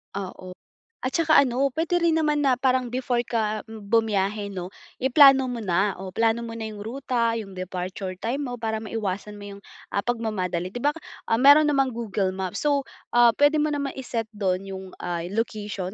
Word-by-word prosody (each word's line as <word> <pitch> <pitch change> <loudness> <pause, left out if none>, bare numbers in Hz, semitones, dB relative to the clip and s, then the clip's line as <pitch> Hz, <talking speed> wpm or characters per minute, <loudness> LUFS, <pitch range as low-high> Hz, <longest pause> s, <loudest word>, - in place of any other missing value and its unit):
Oo. 185 -1 -7 0.5
At 255 +1 -2
saka 320 -2 +4
ano, 270 +1 +2
puwede 335 +5 0
rin 330 -1 +3
naman 300 -2 +1
na 265 -3 +3
parang 255 -1 +1
before 245 0 0
ka 215 -3 -1
bumiyahe 210 -2 0
'no, 185 -1 -6 0.2
iplano 270 0 +6
mo 245 -2 -4
na, 195 0 +1
o 190 +1 -8
plano 225 +4 +1
mo 230 -1 -6
na 225 - -4
'yong 215 -1 -7
ruta, 235 0 -1
'yong 200 -4 -7
departure 185 +1 -5
time 235 +8 -2
mo, 245 - -5
para 220 -1 -2
maiwasan 210 -2 -4
mo 205 - -9
'yong, 200 0 -10 0.3
ah, 200 - +1
pagmamadali. 195 -6 -2
'Di 245 - -5
ba, 290 - +3 0.4
ah, 225 - +3
meron 285 +4 +7
namang 270 -3 +1
Google 205 -5 -2
Maps 190 +8 -4
so, 285 -1 +3 0.6
puwede 290 +1 +4
mo 305 - +1
naman 285 -2 -2
i-set 245 -4 -3
do'n 195 -2 -1
'yong, 190 -1 -7
ah, 175 -1 -3
location 205 -3 -3
225 Hz, 180 wpm, -25 LUFS, 195-260 Hz, 0.6 s, meron